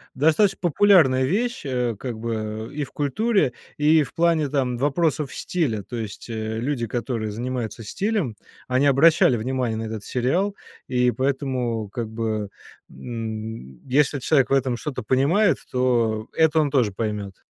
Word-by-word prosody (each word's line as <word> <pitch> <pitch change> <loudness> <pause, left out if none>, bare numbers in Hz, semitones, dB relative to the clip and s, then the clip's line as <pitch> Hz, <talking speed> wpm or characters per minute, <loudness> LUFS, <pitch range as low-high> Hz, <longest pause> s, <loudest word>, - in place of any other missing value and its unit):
достаточно 160 +8 +3
популярная 170 -7 +4
вещь, 240 - -1
э, 125 -4 -1
как 120 -4 -5
бы 110 -1 -4
и 150 - -2
в - - -18
культуре, 195 - +1 0.2
и 155 +1 +4
в 125 - -10
плане 165 -3 +2
там 130 -4 0
вопросов 145 +1 0
стиля, 130 - -2
то 120 +6 -7
есть, 110 +1 -7
э, 110 0 -3
люди, 120 -2 -2
которые 115 -2 -3
занимаются 120 0 -4
стилем, 190 - -1 0.3
они 130 +2 +2
обращали 140 -2 +5
внимание 125 -1 -1
на 110 - -3
этот 110 -2 -6
сериал, 175 +12 0 0.3
и 125 -1 +2
поэтому 130 -4 -1
как 115 0 -4
бы, 110 -2 -2 0.4
м, 110 - -7
если 140 +2 +2
человек 135 0 +2
в - - +1
этом 130 -3 +1
что-то 130 -2 -5
понимает, 145 - +3
то 120 -4 +1
это 160 -1 +3
он 145 - +1
тоже 120 -8 +2
поймет. 105 -3 -4
125 Hz, 150 wpm, -23 LUFS, 110-150 Hz, 0.4 s, обращали